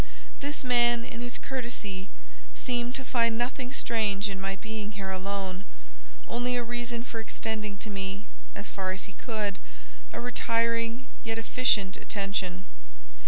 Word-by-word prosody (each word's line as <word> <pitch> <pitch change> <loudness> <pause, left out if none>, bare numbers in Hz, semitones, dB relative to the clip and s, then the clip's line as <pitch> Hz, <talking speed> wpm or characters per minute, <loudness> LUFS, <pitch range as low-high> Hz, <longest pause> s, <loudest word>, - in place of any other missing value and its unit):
This 290 +1 -1
man, 240 -2 +5
in 235 - -5
his 245 0 -2
courtesy, 230 -7 -3 0.5
seemed 245 0 0
to 265 - -3
find 230 -3 +4
nothing 250 +1 0
strange 215 -5 +2
in 190 -1 -3
my 195 0 0
being 220 0 -4
here 195 -1 -2
alone; 190 0 -1 0.6
only 245 +1 +1
a 245 - +2
reason 240 0 -1
for 230 -2 -4
extending 215 -2 -2
to 215 - -5
me, 195 +1 -2 0.3
as 200 - -4
far 190 -1 -1
as 190 - -3
he - - -7
could, 210 -4 -1 0.5
a - - -3
retiring, 230 0 +2 0.2
yet 225 -1 0
efficient 225 -4 +4
attention. 195 -2 0
225 Hz, 145 wpm, -31 LUFS, 200-240 Hz, 0.6 s, man